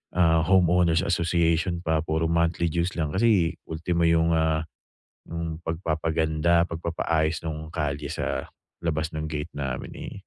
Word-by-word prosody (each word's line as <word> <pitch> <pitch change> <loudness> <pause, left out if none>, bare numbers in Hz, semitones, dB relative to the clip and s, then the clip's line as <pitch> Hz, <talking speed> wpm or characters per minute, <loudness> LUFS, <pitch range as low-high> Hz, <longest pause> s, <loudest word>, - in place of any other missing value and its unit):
ah, 80 -2 +4
homeowners 90 -2 +3
association 85 0 +1
pa, 80 -1 +2
puro 80 +1 0
monthly 85 +1 +1
dues 85 +3 -1
lang. 75 -2 -1
Kasi 95 -5 +3 0.2
ultimo 85 +1 0
yung, 85 0 +3
ah, 80 -1 +1 0.6
yung 85 -1 -4
pagpapaganda, 80 0 +1
pagpapaayos 80 -2 -1
nung 80 0 -5
kalye 75 -3 -3
sa - - -3 0.3
labas 80 -2 -1
ng 80 0 -3
gate 75 -1 -4
namin, 70 -3 -4 0.2
eh, - - -10
80 Hz, 135 wpm, -26 LUFS, 80-85 Hz, 0.6 s, ah